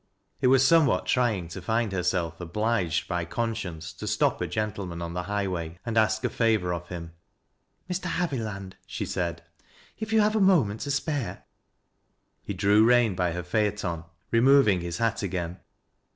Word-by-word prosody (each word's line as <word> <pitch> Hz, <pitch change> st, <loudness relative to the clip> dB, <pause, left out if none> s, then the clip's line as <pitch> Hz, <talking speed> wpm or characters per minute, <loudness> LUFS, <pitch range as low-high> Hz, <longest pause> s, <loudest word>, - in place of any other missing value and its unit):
It -, -, +4 dB
was 130 Hz, 0 st, +5 dB
somewhat 160 Hz, -2 st, +4 dB
trying 110 Hz, -9 st, +1 dB
to 95 Hz, +2 st, -7 dB
find 110 Hz, +3 st, 0 dB
herself 90 Hz, -2 st, -1 dB
obliged 90 Hz, -1 st, 0 dB
by 90 Hz, -2 st, -1 dB
con 115 Hz, +7 st, -2 dB
science 80 Hz, -7 st, -6 dB
to -, -, -7 dB
stop -, -, +1 dB
a -, -, 0 dB
gentleman 100 Hz, -5 st, -3 dB
on 85 Hz, 0 st, -5 dB
the 90 Hz, -, -2 dB
highway 90 Hz, -4 st, -3 dB
and 115 Hz, -1 st, -3 dB
ask 110 Hz, 0 st, +2 dB
a 125 Hz, -, +1 dB
favor 110 Hz, -6 st, +1 dB
of 85 Hz, 0 st, -5 dB
him. 85 Hz, -2 st, -7 dB, 0.4 s
" -, -, -47 dB
Mr. 180 Hz, +1 st, -3 dB
Haviland," 115 Hz, -, -3 dB
she -, -, -4 dB
said. 85 Hz, -1 st, -3 dB, 0.3 s
" -, -, -28 dB
If 220 Hz, 0 st, -4 dB
you 220 Hz, -1 st, +5 dB
have 210 Hz, +1 st, +2 dB
a 215 Hz, -, +2 dB
moment 140 Hz, -, +3 dB
to 145 Hz, -, -4 dB
spare 140 Hz, -, -2 dB, 0.5 s
" -, -, -47 dB
He 100 Hz, -, -3 dB
drew 100 Hz, +3 st, +4 dB
rein 120 Hz, -2 st, +4 dB
by 90 Hz, -2 st, 0 dB
her 90 Hz, +1 st, -4 dB
phaeton, 90 Hz, -3 st, -1 dB, 0.3 s
removing 115 Hz, -5 st, +5 dB
his 85 Hz, 0 st, -4 dB
hat 115 Hz, +1 st, 0 dB
again. 90 Hz, -3 st, -3 dB
100 Hz, 180 wpm, -27 LUFS, 90-120 Hz, 0.5 s, was